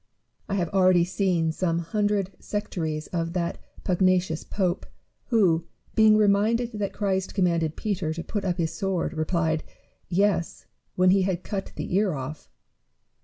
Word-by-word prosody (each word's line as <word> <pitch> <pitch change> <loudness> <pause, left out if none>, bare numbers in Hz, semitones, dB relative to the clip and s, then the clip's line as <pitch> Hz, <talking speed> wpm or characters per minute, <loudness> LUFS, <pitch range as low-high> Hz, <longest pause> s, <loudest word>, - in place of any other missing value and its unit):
I 200 - 0
liave 175 -3 0
already 185 -2 +4
seen 180 -3 +1
some 165 0 0
hundred 200 +3 0
sectaries 160 -7 -3
of 165 -1 -1
that 175 -1 -2 0.2
pugnacious 185 -3 +2
pope, 185 -2 -1 0.4
who, 175 -8 +2 0.3
being 215 -1 +6
reminded 215 +3 +3
tliat 210 -3 -3
Christ 190 -2 -1
commanded 170 -5 +1
Peter 190 -7 -2
to 170 - -4
put 205 +2 -3
up 180 -2 -1
his 165 -2 -1
sword, 185 -1 -1
replied, 160 0 0 0.5
"Yes, 190 -1 +1 0.3
when 185 0 +5
he 195 0 +4
had 185 -1 -1
cut 195 -2 -4
the - - -4
ear 195 -3 +2
off." 135 +3 -7
185 Hz, 145 wpm, -26 LUFS, 170-200 Hz, 0.5 s, being